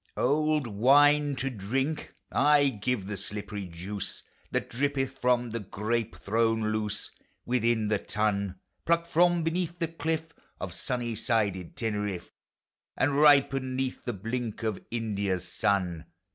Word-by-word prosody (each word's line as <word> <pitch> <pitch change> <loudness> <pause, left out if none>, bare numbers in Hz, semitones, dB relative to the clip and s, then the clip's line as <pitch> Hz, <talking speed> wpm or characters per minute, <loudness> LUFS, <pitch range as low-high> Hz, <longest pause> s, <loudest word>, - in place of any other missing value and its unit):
Old 150 +2 +2
wine 145 +6 +5
to 135 +1 -2
drink! 130 +8 -2
— - - -45
Ay, 145 0 +5
give 120 -3 0
the 105 +1 -4
slippery 100 0 -5
juice 90 +4 -5 0.3
That - - -1
drippeth 135 +1 -1
from 125 -1 +2
the 115 - -2
grape 110 +3 -2
thrown 110 0 +1
loose 105 -1 -2 0.3
Within 120 -3 +1
the 105 -1 +1
tun; 100 -2 -1 0.3
Plucked 170 0 +2
from 175 0 +3
beneath 170 +1 -1
the 165 -2 -1
cliff 160 -1 -2 0.3
Of 90 -1 -5
sunny 120 +6 -2
sided 105 -6 -1
Teneriffe, 105 -5 -3 0.7
And 140 +1 +2
ripened 140 -3 +5
'neath 130 -1 -2
the 120 - -2
blink 115 +3 -4
Of 110 -3 -2
India's 100 -5 -1
sun 90 -4 0
115 Hz, 135 wpm, -28 LUFS, 105-140 Hz, 0.7 s, wine